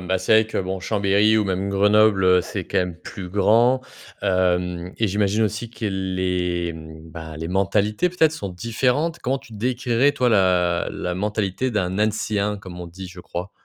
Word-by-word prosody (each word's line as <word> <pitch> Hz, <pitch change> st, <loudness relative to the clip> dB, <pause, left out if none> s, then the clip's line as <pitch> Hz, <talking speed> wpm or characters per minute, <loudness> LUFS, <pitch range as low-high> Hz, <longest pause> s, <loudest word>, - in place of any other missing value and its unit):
bah, 95 Hz, +1 st, 0 dB
c'est -, -, 0 dB
vrai -, -, -7 dB
que -, -, -3 dB
bon, 95 Hz, 0 st, -3 dB
Chambéry 105 Hz, +2 st, +2 dB
ou 105 Hz, -, +1 dB
même 95 Hz, 0 st, -1 dB
Grenoble, 105 Hz, 0 st, +4 dB
heu, 90 Hz, 0 st, +5 dB
c'est -, -, -5 dB
quand -, -, -1 dB
même 90 Hz, -2 st, -2 dB
plus 90 Hz, +2 st, -8 dB
grand, 115 Hz, +6 st, +3 dB, 0.4 s
hem, 90 Hz, -2 st, 0 dB
et 110 Hz, -, +2 dB
j'imagine 105 Hz, +2 st, +1 dB
aussi 110 Hz, +2 st, -3 dB
que 115 Hz, -1 st, -8 dB
les, 90 Hz, -3 st, -1 dB
mmh, 80 Hz, 0 st, -11 dB
bah, 80 Hz, -2 st, -8 dB
les 80 Hz, -, -5 dB
mentalités 100 Hz, -, +1 dB
peut-être 160 Hz, -3 st, +2 dB
sont 100 Hz, -11 st, -5 dB
différentes? 125 Hz, -, -1 dB
Comment 135 Hz, +2 st, -1 dB
tu 115 Hz, -, -16 dB
décrirais 125 Hz, +4 st, +1 dB
toi 125 Hz, -3 st, +1 dB
la 90 Hz, -4 st, +2 dB
la 90 Hz, 0 st, -4 dB
mentalité 105 Hz, +4 st, -1 dB
d'un 95 Hz, -3 st, -1 dB
«Annécien», 105 Hz, -1 st, 0 dB
comme 90 Hz, -3 st, -10 dB
on 85 Hz, -, -7 dB
dit, 95 Hz, +2 st, -9 dB
je 90 Hz, 0 st, -11 dB
crois? 90 Hz, +2 st, -6 dB
100 Hz, 185 wpm, -22 LUFS, 90-110 Hz, 0.4 s, heu